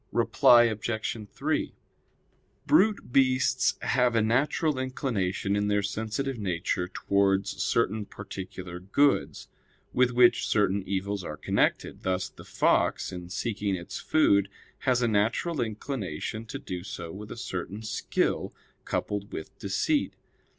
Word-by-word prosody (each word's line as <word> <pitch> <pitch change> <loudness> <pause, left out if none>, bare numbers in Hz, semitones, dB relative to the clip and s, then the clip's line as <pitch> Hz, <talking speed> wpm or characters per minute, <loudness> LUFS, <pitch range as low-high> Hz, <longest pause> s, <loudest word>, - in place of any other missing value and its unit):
Reply 120 -1 +6
Obj. 110 0 -1 0.2
3: - - -2 0.9
Brute 205 - +3
beasts 130 -1 +3
have 125 -2 +2
a 115 - +4
natural 135 +5 +1
inclination 105 -7 -1
in 105 0 +1
their 105 -1 +1
sensitive 110 +6 -3
nature 90 -2 -1
towards 100 +1 +1
certain 105 +1 +1
particular 95 -3 -7
goods, 140 +10 +1 0.5
with 125 0 +4
which 120 -1 +4
certain 100 -1 +2
evils 100 +1 -2
are 75 -3 -6
connected; - - 0
thus 95 0 -1
the - - -14
fox - - +1
in 90 -1 -7
seeking 100 0 -2
its 85 -1 -6
food 100 -11 +3 0.4
has 125 -1 +3
a - - +3
natural 115 +9 +1
inclination 110 - -4
to - - -5
do 90 -1 -6
so 85 -3 -6
with 105 +3 -9
a - - -7
certain 100 -1 -5
skill 110 - -1 0.3
coupled 100 -1 -3
with 80 - -7
deceit. 190 - 0
105 Hz, 130 wpm, -28 LUFS, 95-125 Hz, 0.9 s, Reply